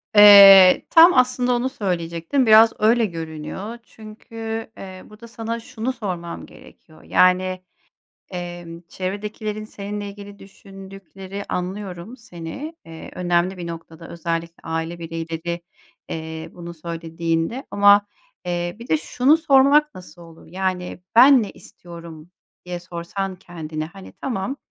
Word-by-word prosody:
Eee, 200 -2 +9
tam 335 +2 +8
aslında 250 0 +2
onu 245 +2 -1
söyleyecektim. 175 +3 -2
Biraz 225 0 +7
öyle 225 +2 +3
görünüyor 165 +5 -7
çünkü, 225 +1 -8
eee, 185 -1 -10
burada 215 +2 -14
sana 230 0 -5
şunu 230 +2 -5
sormam 175 -7 -6
gerekiyor, 155 -1 -18
yani, 185 0 +2 0.7
emm, 175 -2 -7
çevredekilerin 210 +3 -5
seninle 205 -1 -6
ilgili 200 0 -11
düşündükleri, 195 0 -11
anlıyorum 185 +3 -5
seni, 230 - -8
eee, 165 -1 -10
önemli 180 +1 0
bir 175 -1 -7
noktada 165 0 -9
özellikle 170 0 -5
aile 165 +1 -4
bireyleri, 165 +1 -5 0.5
eee, 160 0 -6
bunu 170 -1 -9
söylediğinde 165 - -3
ama, 205 0 +5 0.4
eee, 175 0 -3
bir 235 - -11
de 160 - +3
şunu 250 - +2
sormak 295 0 +4
nasıl 175 -2 -13
olur? 165 -1 -16
Yani, 185 -1 -4
"ben 255 +2 +7
ne 205 - -5
istiyorum?" 170 -2 -13 0.3
diye 180 -1 -6
sorsan 180 +2 -5
kendine, 160 -4 -7
hani, 195 +3 -13
tamam, 250 +1 -4
185 Hz, 120 wpm, -21 LUFS, 170-215 Hz, 0.7 s, Eee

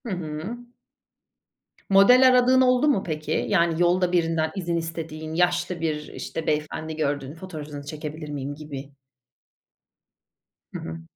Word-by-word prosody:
Hı - - -4
hı. 175 +5 -4 1.3
Model 245 +7 +7
aradığın 255 0 +5
oldu 255 +2 +4
mu 275 -10 +2
peki? 155 -1 -2
Yani 170 0 +2
yolda 175 +1 +3
birinden 165 -2 +1
izin 170 -3 -1
istediğin 160 -1 -5
yaşlı 175 0 +1
bir, 150 -2 -2
işte, 165 - -5
beyefendi 155 +1 -2
gördün 145 -2 -2
fotoğrafınızı 155 -5 -8
çekebilir 155 0 -6
miyim 145 -1 -4
gibi. 145 -2 -8 1.8
Hı - - -4
hı. 80 0 -7
160 Hz, 125 wpm, -25 LUFS, 150-180 Hz, 1.8 s, Model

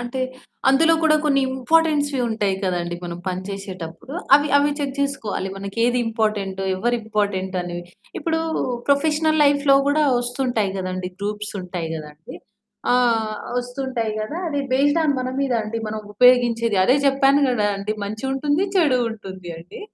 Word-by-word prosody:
అంటే, 245 +2 -4 0.5
అందులో 320 +5 +5
కూడా 310 -1 +5
కొన్ని 275 -2 +3
ఇంపార్టెన్స్‌వి 290 +1 +2
ఉంటాయి 210 -3 0
కదండీ, 175 -2 -2
మనం 170 0 -5
పని 185 0 -2
చేసేటప్పుడు, 190 +2 -7 0.2
అవి 290 +1 +4
అవి 285 +1 +3
చెక్ 280 -2 -3
జేసుకోవాలి. 275 -9 -2
మనకేది 230 +5 0
ఇంపార్టెంటో, 210 -4 -1
ఎవరు 240 +5 0
ఇంపార్టెంటనెవి. 190 -5 -2 0.3
ఇప్పుడూ 320 +1 -1 0.5
ప్రొఫెషనల్ 310 +2 +2
లైఫ్‌లో 285 -1 +4
గూడా 300 +1 +3 0.2
వస్తుంటాయి 245 -5 -1
గదండీ, 185 0 -4
గ్రూప్సుంటాయి 195 -5 -4
గదండీ! 150 0 -10 0.6
ఆహ్, 230 -3 +2 0.2
వస్తుంటాయి 245 -2 -3
గదా! 255 +10 -4
అది 285 -2 -1
బేస్డ్ 290 +5 +3
ఆన్ 290 -2 +2
మన 255 - -2
మీద 275 -2 0
అండి, 215 +2 -4
మనం 215 0 -4
ఉపయోగించేది 240 -3 +4
అదే 255 +7 +4
చెప్పాను 275 +1 +4
కదా 215 -4 +1
అండి, 200 +2 -3
మంచి 215 +4 -6
ఉంటుంది, 290 +6 +1
చెడూ 295 -8 +4
ఉంటుంది 190 -5 -8
అండి, 170 +2 -11
235 Hz, 140 wpm, -22 LUFS, 195-280 Hz, 0.6 s, అందులో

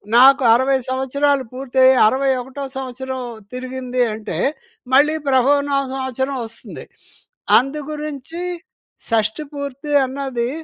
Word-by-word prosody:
నాకు 265 +3 +7
60 260 +3 +3
సంవత్సరాలు 270 +2 +1
పూర్తయ్యి 260 0 +3
60 270 +4 +1
ఒకటో 265 +3 -7
సంవత్సరం 260 0 -5 0.3
తిరిగింది 255 0 -3
అంటే 215 0 -5 0.6
మళ్ళీ 295 +4 +5
ప్రభవ 265 +1 +4
నామ 275 -1 +1
సంవత్సరం 265 +1 -2
వస్తుంది. 230 0 -10 0.7
అందుగురించి 300 +3 -4 0.7
షష్టిపూర్తి 280 +5 -2
అన్నది, 260 -3 -3
265 Hz, 95 wpm, -20 LUFS, 255-280 Hz, 0.7 s, నాకు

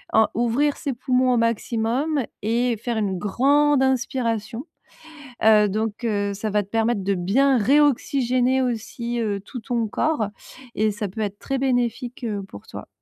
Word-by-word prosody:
heu, 220 0 +6
ouvrir 240 +5 +1
ses 280 -4 -3
poumons 255 +1 +1
au 245 - +2
maximum 235 +5 0 0.2
et 235 +2 0
faire 235 +2 -3
une 195 -4 -1
grande 280 +8 +3
inspiration. 240 -2 -1 0.8
Heu, 210 -1 +6
donc, 215 +3 -3
heu, 205 -2 0
ça 215 +2 -3
va 210 0 +1
te 195 - -15
permettre 225 -1 0
de 200 - +1
bien 245 +10 +2
réoxygéner 260 0 +2
aussi, 235 0 -3
heu, 205 -3 -1
tout 225 +5 -8
ton 235 -1 -1
corps, 235 -2 0 0.5
et 215 0 +2
ça 210 0 -4
peut 200 +4 -7
être 205 -1 -3
très 270 -1 -3
bénéfique, 245 -1 -1
heu, 205 -3 -2
pour 100 - -12
toi. - - -9
235 Hz, 160 wpm, -23 LUFS, 210-255 Hz, 0.8 s, heu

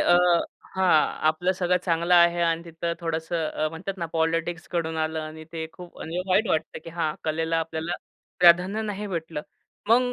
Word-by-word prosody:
अ - - +3 0.6
हां, 190 -1 +2 0.4
आपलं 175 +4 +1
सगळं 180 -1 +1
चांगलं 170 +1 +2
आहे 170 0 +5
आणि 165 0 +1
तिथं 170 0 -3
थोडंसं 165 -1 -2
अ, 155 - -1
म्हणतात 185 +5 -6
ना 170 - -2
पॉलिटिक्सकडून 165 0 -1
आलं 160 0 -1
आणि 155 0 -8
ते 160 -1 -3
खूप 180 -1 -12 0.3
वाईट 195 +4 +3
वाटतं. 160 -2 -1
की 165 - -7
हां 160 -2 -1
कलेला 160 +1 0
आपल्याला 160 +1 -3 0.5
प्राधान्य 180 +5 +5
नाही 210 -1 -4
भेटलं. 165 -5 -4 0.5
मग 245 +2 +4
170 Hz, 160 wpm, -25 LUFS, 160-180 Hz, 0.6 s, आहे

